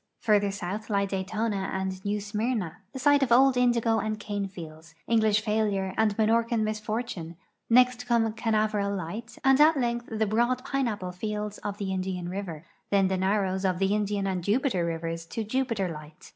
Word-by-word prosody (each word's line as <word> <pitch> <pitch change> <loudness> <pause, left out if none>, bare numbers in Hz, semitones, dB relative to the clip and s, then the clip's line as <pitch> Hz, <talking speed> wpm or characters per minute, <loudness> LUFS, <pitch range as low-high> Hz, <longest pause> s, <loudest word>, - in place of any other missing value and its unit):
Further 205 -2 +3
south 195 +2 -5
lie 200 -1 +2
Daytona 195 +1 -2
and 190 0 -3
New 205 +1 -1
Smyrna, 210 -4 -2
the 270 - -7
site 285 +2 +4
of 260 -3 +1
old 265 +2 +6
indigo 235 -2 +2
and 215 +1 -2
cane 205 -1 -3
fields, 165 -3 -11
English 220 -2 +3
failure 210 -3 0
and 220 -2 +1
Minorcan 230 +1 +2
misfortune; 215 -5 -3 0.3
next 250 0 +4
come 230 -2 +2
Canaveral 215 -2 0
light 200 +6 -6
and 270 +1 +5
at 310 0 +6
length 240 -2 -1
the 220 0 +1
broad 240 +4 +1
pineai)})le 215 -9 -2
fields 210 +2 -4
of 205 -1 -5
the 195 -2 -3
Indian 185 -2 -3
river; 180 -4 -5 0.2
then 195 -2 +3
the 190 - +1
narrows 190 0 0
of 185 -2 +1
the 195 +2 +1
Indian 205 -1 0
and 185 -2 -2
Jupiter 210 - +1
rivers 165 0 -3
to 220 +5 -4
Jui)iter 225 -6 -1
light. 150 0 -12
210 Hz, 170 wpm, -27 LUFS, 190-230 Hz, 0.3 s, old